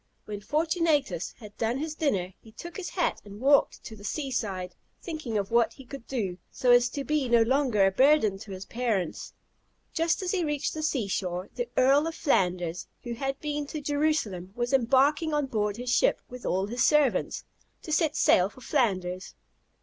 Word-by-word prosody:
When 205 -1 -6
Fortunatus 300 - 0
had 210 -3 -12
done 230 +2 0
his 305 +2 -3
dinner, 195 - -1
he 220 - -16
took 345 +9 -9
his 390 -3 -5
hat 355 - -1
and 205 0 -11
walked 280 +3 +3
to 220 - -9
the 205 - -14
sea 270 +7 -3
side, 190 -7 -3 0.3
thinking 310 -10 -4
of 200 0 -2
what 235 0 +3
he 270 - -13
could 265 -1 -10
do, 195 -9 -3
so 250 - +1
as 245 0 +6
to 280 - -4
be 295 -3 0
no 235 -1 +5
longer 245 -5 +2
a 195 - +3
burden 240 -4 +4
to 205 -1 -10
his 190 0 -7
parents. 225 -8 -2 0.6
Just 330 +3 +1
as 360 - -1
he 370 -3 0
reached 295 -2 -1
the 315 - -4
sea 275 -8 0
shore, 180 -1 -3
the 485 -1 -3
Earl 275 +4 +4
of 330 - -4
Flanders, 180 - 0 0.2
who 240 -2 -4
had 270 +3 -3
been 295 -1 -3
to 310 - -5
Jerusalem, 285 - -1
was 240 +2 -2
embarking 275 +5 +3
on 295 -1 +1
board 210 -5 -1
his 245 0 -3
ship - - +3
with 250 0 -8
all 190 +1 +1
his 235 +4 -1
servants, 300 -4 +2 0.4
to 315 - -7
set 310 0 +2
sail 180 +2 +4
for 235 +5 -16
Flanders. 185 -9 -1
250 Hz, 195 wpm, -28 LUFS, 205-295 Hz, 0.6 s, as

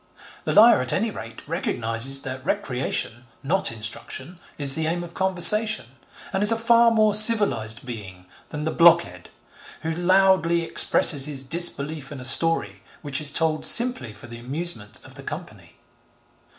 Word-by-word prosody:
The - - -3
liar 225 - +4
at 130 - -2
any 225 +3 -3
rate 115 - -12
recognises 135 -4 -3
that 130 0 -8
recreation, 125 -2 -4 0.2
not 180 +4 -1
instruction, 130 - -6 0.2
is 140 -2 +3
the 160 +1 -3
aim 175 +2 -4
of 170 -1 -13
conversation, 190 - +3 0.4
and 190 - -3
is 210 +2 +4
a 230 - -1
far 235 +1 +2
more 215 -2 0
civilised 200 - +3
being 95 -7 -11 0.2
than 150 0 -8
the 160 - -4
blockhead 165 - +1 0.5
who 160 - -4
loudly 175 -1 0
expresses 150 -3 +3
his 140 -3 -3
disbelief 150 -2 -1
in 140 - -10
a 125 - -8
story 120 - +2 0.2
which 140 0 -4
is 150 - +4
told 155 +1 -1
simply 240 - +4
for 105 - -16
the 115 -1 -12
amusement 130 -4 -3
of - - -15
the - - -13
company. - - -11
155 Hz, 155 wpm, -21 LUFS, 125-190 Hz, 0.5 s, liar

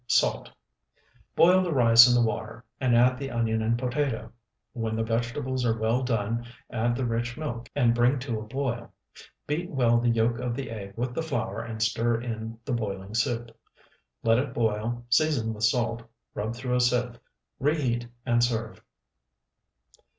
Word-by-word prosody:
Salt. - - +2 0.9
Boil 185 +2 +6
the 180 -2 -1
rice 120 -3 +8
in 120 - +4
the 120 -1 +4
water, 115 +2 -5
and 125 -3 +2
add 125 +2 +4
the 135 -1 -4
onion 115 -2 0
and 115 +2 +1
potato. 125 -3 -2 0.4
When 115 -2 -2
the 115 - 0
vegetables 120 +3 -2
are 115 -2 +1
well 115 +3 +1
done 115 -1 -1 0.2
add 120 +1 0
the 130 - -1
rich 120 +1 -2
milk 120 -7 -5
and 120 -4 +3
bring 120 +3 +3
to 120 -4 -3
a 110 - -9
boil. 125 -1 -3 0.5
Beat 170 +4 -2
well 120 -4 +3
the 120 0 +1
yolk 115 +1 +1
of 125 -1 -2
the 135 -2 -5
egg 100 -3 -7
with 120 +1 -2
the 165 - -2
flour 115 -10 -3
and 115 -1 -3
stir 115 +1 +1
in 115 -1 -5
the 135 - -2
boiling 100 -3 -4
soup. 115 +1 -1 0.7
Let 115 +1 +4
it 130 -2 -3
boil, 115 +1 -1
season 125 -4 +2
with 110 0 0
salt, 115 0 +1 0.3
rub 110 +3 -3
through 125 0 -1
a - - +2
sieve; 125 -1 +1 0.4
reheat, 130 -5 0 0.2
and 120 -1 +3
serve. 115 -2 -2
120 Hz, 170 wpm, -27 LUFS, 115-125 Hz, 0.9 s, rice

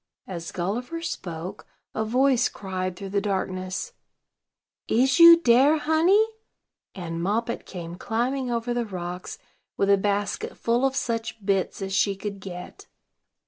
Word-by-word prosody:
As 170 -3 -6
Gulliver 245 - -3
spoke, 180 - -6 0.3
a 220 - -1
voice 255 +3 +3
cried 185 -2 -4
through 195 +1 -7
the 200 0 +1
darkness: 190 - -3 0.9
"Is 265 +7 +3
you 335 0 +10
dere, 270 +2 +5
honey?" 330 +8 +4 0.7
and 165 -2 -5
Moppet 225 +6 -1
came 175 -2 -7
climbing 245 +5 -1
over 240 0 -1
the 240 0 0
rocks, 180 -2 -6 0.4
with 200 0 +3
a 200 - +6
basket 200 0 -2
full 235 +3 +1
of 270 - -4
such 230 -4 -3
bits 195 0 0
as 195 0 -4
she 200 +1 +2
could 200 0 -6
get. 180 -2 -9
205 Hz, 140 wpm, -25 LUFS, 185-250 Hz, 0.9 s, you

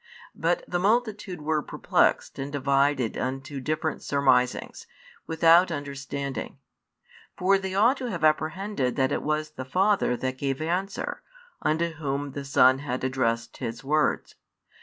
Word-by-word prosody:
But - - 0
the 175 - -1
multitude 210 -4 0
were 155 0 +1
perplexed - - +1
and 135 +1 -4
divided 140 -3 +1
unto 135 +2 -4
different 155 +3 -2
surmisings, 130 -3 +1 0.4
without 165 +2 +5
understanding. 140 -2 -5 0.8
For 195 +2 +3
they 190 -1 -4
ought 235 +7 +4
to 255 -2 -4
have 170 -7 -4
apprehended 155 - +1
that 130 -1 +1
it - - 0
was 155 0 -1
the 130 - -6
Father 185 -2 +1
that 130 +1 -3
gave 135 -1 -1
answer, 190 - -2 0.4
unto 165 +2 +1
Whom 145 -2 -3
the 140 +1 -6
Son 130 -1 +5
had 130 -3 -4
addressed 120 -3 -1
His 115 -1 -5
words. 150 +2 0
145 Hz, 140 wpm, -26 LUFS, 135-175 Hz, 0.8 s, without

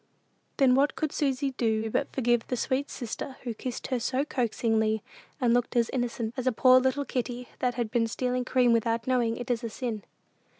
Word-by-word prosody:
Then 265 -3 +5
what 275 +3 +3
could 310 -2 -1
Susy 275 -1 0
do 225 -3 0
but - - -1
forgive 240 -2 +1
the 250 - -2
sweet 265 +4 -1
sister, 260 +2 -6
who 240 -3 -3
kissed 245 +2 -5
her 250 - +1
so 260 +4 0
coaxingly, 225 -4 0 0.4
and 245 -3 +3
looked 245 +1 +1
as 235 -1 +2
innocent 240 -3 -2
as 255 -1 -3
a - - +5
poor 255 +2 +6
little 260 +2 0
kitty 245 -1 -3
that 250 -1 0
has 235 -2 -1
been 230 0 +1
stealing 250 +2 -1
cream 250 -2 +3
without 230 0 +1
knowing 240 -3 +1
it 245 +1 -3
is 240 0 -1
a 230 - -2
sin? 225 -1 -4
245 Hz, 200 wpm, -28 LUFS, 230-260 Hz, 0.4 s, poor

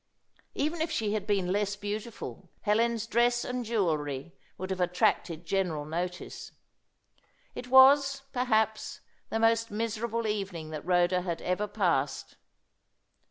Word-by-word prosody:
Even 315 +3 -1
if 320 - 0
she 220 -9 -1
had 215 -2 -2
been 195 -4 +1
less 205 +1 0
beautiful, 205 -2 -6
Helen's 230 +2 +1
dress 240 +1 +2
and 250 0 -3
jewellery 165 - -1 0.2
would 185 +1 -5
have 185 -1 -2
attracted 175 -1 +1
general 165 -5 -1
notice. 175 +3 -5 1.0
It 250 - -7
was, 275 +1 +6
perhaps, 220 -4 0 0.3
the - - -1
most 230 0 +3
miserable 230 +1 -2
evening 195 -7 -3
that 155 -2 -5
Rhoda 180 0 +3
had 170 -2 -3
ever 185 +4 0
passed. 185 -9 -1
205 Hz, 125 wpm, -29 LUFS, 180-230 Hz, 1.0 s, was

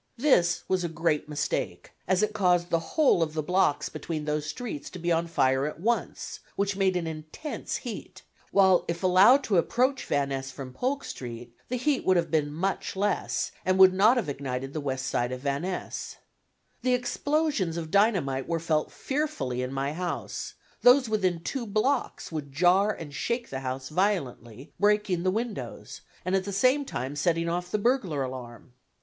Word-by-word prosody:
This 230 -10 +3
was 185 -1 +1
a 170 - -1
great 165 -2 0
mistake, 150 -1 -3 0.2
as 190 +2 +2
it 215 0 0
caused 180 -4 +2
the 165 - +3 0.2
whole 295 - +5
of 155 -1 -1
the 155 - -1
blocks 180 -3 +2
between 155 -3 -5
those 150 0 -1
streets 150 -2 -5
to - - -9
be 175 0 -1
on 165 0 +1
fire 135 -4 +2
at 150 - -6
once, 235 +6 -2 0.2
which 200 0 0
made 190 -1 +2
an 170 - -2
intense 160 - -5
heat, - - -7 0.3
while 190 -2 +5
if 170 +2 -3
allowed 195 +10 +6
to 195 -8 +3
approach 255 +9 +1
Van 140 -1 +1
Ness 135 -1 -3
from 130 -1 -8
Polk 265 - -1
Street 120 -1 -8
the 250 - -1
heat 275 +2 +1
would 185 -1 +4
have 170 -1 0
been 150 -2 +1
much 185 +7 -2
less, 200 +2 0
and 185 0 +2
would 190 -1 +8
not 215 +7 +5
have 240 - 0
ignited 135 -1 -4
the 155 - -3
west 130 -2 -2
side 120 -2 0
of 130 0 -5
Van 140 0 -1
Ness. 180 0 -4 0.7
The 255 -1 +3
explosions 250 - 0
of 160 -2 -5
dynamite 185 - +2
were 165 -1 0
felt 155 -2 0
fearfully 265 - -2
in 125 0 -3
my 135 +2 -2
house; 175 +2 -4 0.3
those 250 -1 +6
within 185 -6 0
two 240 +6 -4
blocks 230 +4 0
would 150 -3 -5
jar 180 +8 +4
and 155 -7 -8
shake 235 - -2
the 130 - -3
house 130 0 -4
violently, 145 - -2
breaking 210 -3 +2
the 185 - +1
windows, 225 +3 -4 0.2
and 185 +1 +1
at 190 -1 0
the 200 - -4
same 255 +8 +3
time 130 - -4
setting 165 +2 +1
off 175 +1 -2
the 210 - 0
burglar 205 - +1
alarm. 125 -1 -8
175 Hz, 185 wpm, -27 LUFS, 145-210 Hz, 0.7 s, would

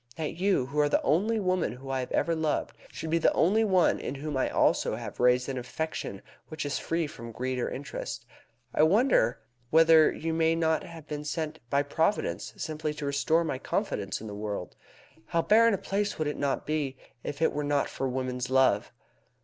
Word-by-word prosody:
That 155 -2 -3
you, 190 -8 +2
who 140 +3 -3
are 145 0 +4
the - - +2
only 215 +8 +2
woman 185 - 0
whom 135 +2 -8
I 135 - 0
have 125 - -4
ever 170 - +1
loved, 160 -2 -1 0.2
should 160 - -5
be 165 - +3
the - - +4
only 205 +7 +3
one 185 -5 +3
in 135 - -4
whom 145 +1 -4
I 130 - +1
also - - +2
have - - -7
raised 125 0 +4
an 135 -2 -3
affection 125 -5 -5 0.2
which 155 -2 -5
is 145 - -1
free 165 0 -1
from 115 -6 -8
greed 130 +2 -3
or - - -1
interest. 140 +2 -6 0.5
I - - +2
wonder 165 - +4 0.3
whether 160 0 +6
you 165 +1 -3
may 160 0 +2
not 160 -1 +1
have 165 -3 -11
been 150 0 -4
sent 155 +1 -3
by 140 +2 +2
Providence 160 +7 -1
simply 155 -1 -3
to 150 -1 -5
restore 150 +4 +2
my 150 -5 -3
confidence - - -2
in 110 - -9
the 105 - -6
world. 105 -3 -5 0.5
How 165 0 +1
barren 230 0 +5
a - - -3
place 205 +2 -2
would 155 - -1
it 150 - -3
not 140 -1 -1
be 145 -4 -2 0.3
if 145 - -5
it 160 - +2
were 150 - -2
not 145 -1 +1
for 135 - -3
woman's 125 -1 -3
love! 130 -6 +3
150 Hz, 205 wpm, -28 LUFS, 130-165 Hz, 0.5 s, whether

